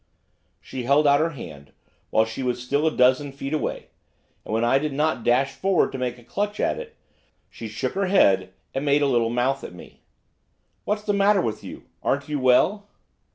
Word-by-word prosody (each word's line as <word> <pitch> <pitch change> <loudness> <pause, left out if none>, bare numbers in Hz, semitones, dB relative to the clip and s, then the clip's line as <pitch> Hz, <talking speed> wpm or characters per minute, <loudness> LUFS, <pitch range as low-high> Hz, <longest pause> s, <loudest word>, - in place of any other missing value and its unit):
She 130 - -7
held 140 +5 +3
out 140 0 +5
her 160 +2 +1
hand, 70 - -10 0.4
while 110 - +3
she 115 +4 -6
was 125 -1 -1
still 140 +5 +1
a - - +2
dozen 130 +3 +3
feet 140 +1 -6
away, 155 - -3 0.5
and - - -8
when 110 +1 +1
I 135 +3 +3
did 150 0 -3
not 150 +3 +2
at - - -4
once - - -13
dash 130 +3 +3
forward 190 -2 +1
to 135 - -6
make 125 -1 -2
a 120 - -16
clutch 205 - -3
at - - 0
it, 485 -1 -9 0.6
she 115 - -8
shook 105 +4 -3
her 195 0 0
head 95 - +3 0.2
and 135 - -2
made 145 0 +3
a - - +3
little 120 -4 +2
mouth 125 +3 0
at 90 - -8
me. 90 - -14 0.8
'What's 210 0 -1
the 205 - 0
matter 200 0 +4
with 110 -10 -2
you? - - -9 0.2
Aren't 140 +2 -1
you 150 -1 -1
well? 180 +11 +3
135 Hz, 210 wpm, -24 LUFS, 120-160 Hz, 0.8 s, out